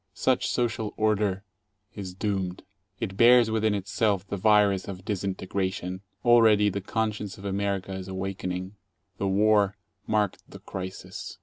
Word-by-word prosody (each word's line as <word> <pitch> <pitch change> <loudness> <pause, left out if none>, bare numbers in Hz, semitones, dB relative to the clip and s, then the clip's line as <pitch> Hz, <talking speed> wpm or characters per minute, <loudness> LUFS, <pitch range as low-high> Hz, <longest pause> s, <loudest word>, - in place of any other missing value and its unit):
Such - - +1
social 110 -3 -1
"order" 105 -3 +1 0.5
is 95 -3 -7
doomed. 95 -2 -2 0.4
It 95 0 -4
bears 120 0 +6
within 110 -1 +1
itself 100 0 0
the 100 - -3
virus 100 -1 +3
of 95 -2 -7
disintegration. 95 -2 -3 0.2
Already 110 -3 +6
the 100 0 -3
conscience 105 -1 -2
of 100 - -11
America 100 -1 -2
is 95 0 -6
awakening. 95 0 -4 0.5
The 100 - 0
war 100 0 +3 0.3
marked 105 -3 0
the - - -10
crisis. 95 0 -7
100 Hz, 130 wpm, -27 LUFS, 95-105 Hz, 0.5 s, bears